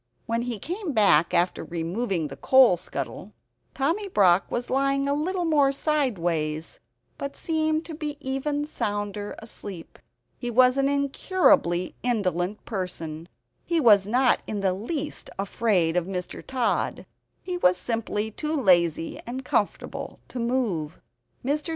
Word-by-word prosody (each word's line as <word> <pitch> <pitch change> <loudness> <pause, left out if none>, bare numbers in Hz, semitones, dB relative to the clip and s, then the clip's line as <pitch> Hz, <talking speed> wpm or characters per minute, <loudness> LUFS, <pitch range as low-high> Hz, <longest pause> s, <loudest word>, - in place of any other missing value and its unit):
When 230 0 -1
he 240 -2 -3
came 350 - -4
back 200 -8 +4
after 180 0 +1
removing 175 +1 -2
the 135 - -7
coal 255 - +6
scuttle, 170 - -6 0.4
Tommy 330 +10 0
Brock 195 - +4
was 240 0 -3
lying 275 +1 +1
a 280 - +2
little 350 +5 -1
more 290 -4 +4
sideways; 175 - -1 0.4
but 280 0 -4
he - - -15
seemed 315 -1 0 0.3
even 285 +2 -2
sounder 205 -6 -3
asleep. 200 -5 -9 0.4
He 245 - -3
was 250 +2 +5
an 275 0 +2
incurably 280 - +2
indolent 200 -5 -1
person; 170 -5 -5 0.3
he 340 -1 0
was 205 -8 +6
not 250 +3 +3
in 210 -2 -3
the 190 -2 +2
least 280 - -4
afraid 195 -4 +1
of 180 0 +1
Mr. 180 -2 -5
Tod; 255 -3 -1 0.4
he 360 -1 -3
was 180 - +4
simply 220 +1 -2
too 305 +7 -2
lazy 175 - +2
and 255 +2 -5
comfortable 205 - -2
to 250 - -5
move. 230 - -1 0.5
Mr. 295 +4 -1
230 Hz, 135 wpm, -26 LUFS, 180-280 Hz, 0.5 s, coal